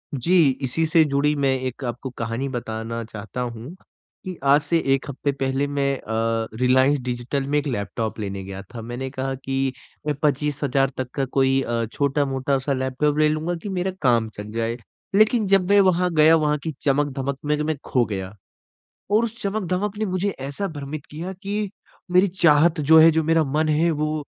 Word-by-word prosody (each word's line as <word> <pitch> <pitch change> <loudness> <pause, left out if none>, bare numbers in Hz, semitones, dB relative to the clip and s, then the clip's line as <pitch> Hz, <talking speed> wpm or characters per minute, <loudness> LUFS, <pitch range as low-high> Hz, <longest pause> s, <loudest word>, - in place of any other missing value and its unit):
जी, 165 +3 +4
इसी 140 +5 0
से 160 0 +4
जुड़ी 145 +1 +1
मैं 140 -2 +2
एक 130 +2 -7
आपको 120 +2 -4
कहानी 115 +4 -2
बताना 115 -2 -4
चाहता 110 +2 -7
हूँ 120 +4 -6 0.5
कि 185 -2 -5
आज 140 +2 +5
से 155 +4 +1 0.2
1 135 - -1
हफ़्ते 140 +1 -1
पहले 135 0 -1
मैं 140 -1 0
अ, 115 0 -1
रिलायंस 130 +3 +4
डिजिटल 125 +2 -3
में 145 +1 +1
एक 145 - -4
लैपटॉप 110 -2 -3
लेने 100 -2 -4
गया 95 0 -7
था। 115 - -6
मैंने 120 +3 -5
कहा 135 0 -3
कि 135 0 -2 0.4
अ, - - +2
25,000 140 -2 +1
तक 130 -1 -3
का 135 - 0
कोई 135 0 +3
अ, 120 -2 -1
छोटा-मोटा-सा 140 -1 0
लैपटॉप 130 +3 0
ले 155 0 +4
लूँगा 155 +3 -1
कि 205 - -4
मेरा 190 0 -1
काम 120 -5 +2
चल 105 +1 -7
जाए 115 +1 -2 0.4
लेकिन 215 +2 +4
जब 195 -1 +3
मैं 205 0 +6
वहाँ 180 -1 +3
गया 155 +1 +6
वहाँ 150 -2 +1
की 160 - -2
चमक-धमक 140 -1 0
में 150 0 +1
मैं 155 +1 -1
खो 125 -2 +2
गया 95 -3 -5 0.8
और 215 +3 +4
उस 230 0 -4
चमक-धमक 200 0 -2
ने 215 - -1
मुझे 185 +1 -1
ऐसा 140 +9 -3
भ्रमित 145 -3 -7
किया 170 +5 -5
कि 205 +1 -2 0.4
मेरी 180 +2 +5
चाहत 170 -2 +3
जो 160 +2 +6
है 165 +1 +8
जो 160 0 +1
मेरा 165 +1 +3
मन 155 +2 0
है 155 +3 +3
वो 155 0 -2
140 Hz, 185 wpm, -23 LUFS, 130-160 Hz, 0.8 s, है